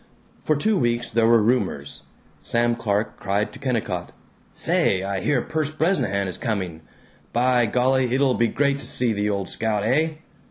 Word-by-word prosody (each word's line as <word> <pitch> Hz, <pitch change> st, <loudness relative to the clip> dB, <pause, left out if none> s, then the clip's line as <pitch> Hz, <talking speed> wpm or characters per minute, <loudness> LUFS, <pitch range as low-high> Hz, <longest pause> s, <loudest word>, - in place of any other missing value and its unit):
For 155 Hz, -, +2 dB
two 205 Hz, +7 st, +1 dB
weeks 120 Hz, -2 st, 0 dB
there 115 Hz, 0 st, +3 dB
were 115 Hz, -2 st, +5 dB
rumors. 105 Hz, -, -1 dB, 0.4 s
Sam 120 Hz, 0 st, +1 dB
Clark 105 Hz, -1 st, -2 dB
cried 100 Hz, +2 st, -1 dB
to -, -, -11 dB
Kennicott, 125 Hz, -5 st, -2 dB, 0.4 s
"Say, 95 Hz, 0 st, +1 dB
I 100 Hz, 0 st, -2 dB
hear 125 Hz, +5 st, +1 dB
Perce 155 Hz, -2 st, -2 dB
Bresnahan 155 Hz, -, 0 dB
is 90 Hz, -, -4 dB
coming! 95 Hz, -9 st, -3 dB, 0.5 s
By 125 Hz, 0 st, +3 dB
golly 125 Hz, +2 st, +2 dB
it'll 135 Hz, 0 st, +3 dB
be 120 Hz, -1 st, +2 dB
great 140 Hz, +2 st, 0 dB
to -, -, -8 dB
see 120 Hz, -3 st, +1 dB
the 105 Hz, 0 st, -1 dB
old 100 Hz, -2 st, -2 dB
scout, 110 Hz, -2 st, -1 dB
eh?" 160 Hz, +8 st, +2 dB
120 Hz, 165 wpm, -23 LUFS, 105-130 Hz, 0.5 s, were